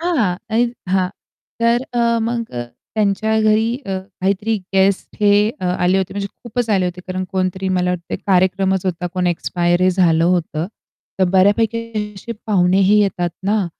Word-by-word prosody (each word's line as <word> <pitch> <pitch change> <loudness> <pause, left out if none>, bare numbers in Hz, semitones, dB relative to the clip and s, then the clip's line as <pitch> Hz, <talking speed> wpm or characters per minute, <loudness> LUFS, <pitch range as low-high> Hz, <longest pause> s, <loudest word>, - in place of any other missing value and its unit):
हां. 275 - +1
आणि 235 +2 +2 0.2
हां. 185 -1 +2 0.5
तर 235 +2 +3
अ, 235 -1 +2
मग 230 0 -2
अ, 120 0 -3 0.3
त्यांच्या 220 +1 +1
घरी 215 +1 +3 0.2
अ, 190 -1 -2 0.2
काहीतरी 200 +4 0 0.2
गेस्ट 190 0 +2
हे 205 -1 +5 0.3
अ, - - -4
आले 180 +1 +2
होते 190 -1 -2
म्हणजे 200 0 -2 0.2
खूपच 240 -1 -2
आले 190 -3 +2
होते 180 0 -5
कारण 185 0 -3
कोणतरी 185 0 -1
मला 180 -1 +1
वाटत 175 -1 -4
कार्यक्रमच 190 0 +2
होता 180 -1 -2
कोण 180 -1 0
एक्सपायर 175 +1 +1
झालं 170 -3 +3
होतं. 170 -2 0 0.5
तर 190 - +4
बऱ्यापैकी 215 +2 +1
असे 230 +4 -7
पाहुणे 185 -3 +3
ही 205 +2 +5
येतात 180 -4 0
ना, 205 -1 +1
190 Hz, 160 wpm, -19 LUFS, 180-220 Hz, 0.5 s, हे